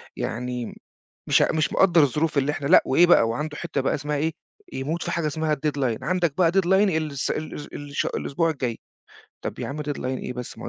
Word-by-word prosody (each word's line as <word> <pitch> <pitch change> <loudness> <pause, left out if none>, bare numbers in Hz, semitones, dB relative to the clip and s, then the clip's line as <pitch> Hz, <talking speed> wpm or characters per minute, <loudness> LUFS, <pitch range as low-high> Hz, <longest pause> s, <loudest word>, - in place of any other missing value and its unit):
يعني 125 0 -4 0.5
مش - - +5
آ - - +2
مش 155 -1 0
مقدّر 175 -4 +5
الظروف 150 +3 +1
اللي 140 +2 +1
إحنا 145 - -4
لأ، 175 - +7
وإيه 170 +6 +5
بقى، 145 -9 +5
وعنده 150 +6 -3
حِتّة 140 - -3
بقى 135 - 0
اسمها 150 0 -2
إيه، 160 +3 0 0.4
يموت 155 +6 -3
في - - -3
حاجه 170 -2 -1
اسمها 155 +1 0
الdeadline 140 -5 -1
عندك 170 -4 0
بقى 170 -3 +4
deadline 190 -1 +2
ال 175 -6 +2
الس 140 - -3
الأس 155 -1 -4
ال 145 0 -9
الش 140 - -1
الأسبوع 165 +4 -1
الجاي، 125 -7 -3 0.7
طَب - - -4
يا - - -4
عم 150 +2 -4
deadline 145 -3 -4
إيه 130 0 -3
بس، 125 -2 -7
ما - - -7
هو - - -4
150 Hz, 220 wpm, -24 LUFS, 135-160 Hz, 0.7 s, لأ